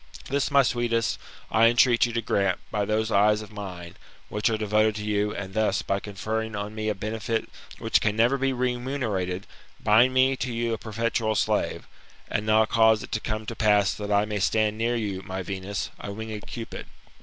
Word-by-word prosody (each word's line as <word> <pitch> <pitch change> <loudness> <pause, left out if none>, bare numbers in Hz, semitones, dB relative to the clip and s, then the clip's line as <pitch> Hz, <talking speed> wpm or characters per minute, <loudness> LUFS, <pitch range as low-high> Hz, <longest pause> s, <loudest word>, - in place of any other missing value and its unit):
This, 140 0 0
my 140 -1 +5
sweetest, 120 -2 0 0.3
I 115 +1 +5
entreat 120 0 +4
you 120 - -6
to 115 0 -1
grant, 100 -2 +1
by 105 -1 0
those 110 +2 0
eyes 105 +1 +3
of 105 - -13
mine, 90 -4 -7 0.3
which 105 +2 0
are 110 - 0
devoted 110 0 +2
to 105 -1 -5
you, 105 0 0
and 95 -1 -6
thus, 105 -2 +1
by 100 - 0
conferring 110 +2 -4
on 105 +1 -4
mt 110 0 -2
a 105 - -1
benefit 110 +3 -2 0.3
which - - +2
can 105 -1 +1
never 120 +5 +3
be 135 0 +1
remunerated, 120 -7 -2 0.3
bind 115 +5 +5
me 130 +1 +4
to 125 - -3
you 115 0 -1
a 110 - -3
perpetual 110 0 -1
slave; - - 0 0.5
and 105 +1 -1
now 110 0 +5
cause 110 -1 +4
it - - -10
to 110 +1 -3
pass 105 -3 +3
that 105 0 -5
I 100 +1 +3
may 105 -1 -3
stand 105 +2 +2
near 115 +2 0
you, 100 -5 -2
my 95 0 -5
Venus, 95 +1 -4
a 100 - -6
winged 110 0 -6
Cupid. 115 -2 -7
110 Hz, 190 wpm, -26 LUFS, 105-115 Hz, 0.5 s, my